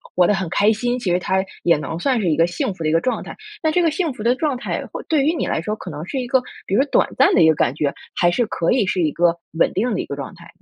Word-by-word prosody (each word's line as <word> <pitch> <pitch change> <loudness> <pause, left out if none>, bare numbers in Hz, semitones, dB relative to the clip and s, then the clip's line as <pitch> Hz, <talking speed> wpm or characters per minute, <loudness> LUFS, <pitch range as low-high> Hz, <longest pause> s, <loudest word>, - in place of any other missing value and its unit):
活 180 - +5
得 - - +3
很 190 -3 -2
开 205 +3 +3
心， 240 +3 -1
其 190 -7 -1
实 175 - +2
他 190 +1 0 0.2
也 170 -2 +4
能 155 +2 -5
算 255 +4 +1
是 185 - +1
一 155 - +1
个 165 - +5
幸 175 +3 -2
福 170 - -7
的 155 - +1
一 - - +1
个 165 +1 +3
状 255 - -1
态。 - - -9 0.3
那 315 - +1
这 355 +3 +2
个 330 - +3
幸 320 -2 -1
福 230 - -10
的 240 +2 +3
状 290 0 -1
态 245 - -4
或 - - -6
对 305 -4 +1
于 310 +4 +2
你 335 - -2
来 - - -1
说， 210 +6 -3
可 190 - -9
能 150 +2 -6
是 265 - -3
一 250 - -3
个 260 +1 +3 0.3
比 195 - 0
如 255 - +5
说 290 - 0
短 - - +3
暂 270 - +5
的 - - +4
一 160 - +6
个 160 - +3
感 125 - +1
觉， 145 -1 -1 0.2
还 175 - +3
是 240 +6 +1
可 170 -5 -1
以 240 -5 +2
是 185 -1 0
一 155 -3 +1
个 170 +1 +2 0.2
稳 - - +4
定 225 +4 0
的 - - -2
一 - - -2
个 140 - -5
状 140 -1 -7
态？ 170 0 -14
190 Hz, 360 characters per minute, -20 LUFS, 170-255 Hz, 0.3 s, 一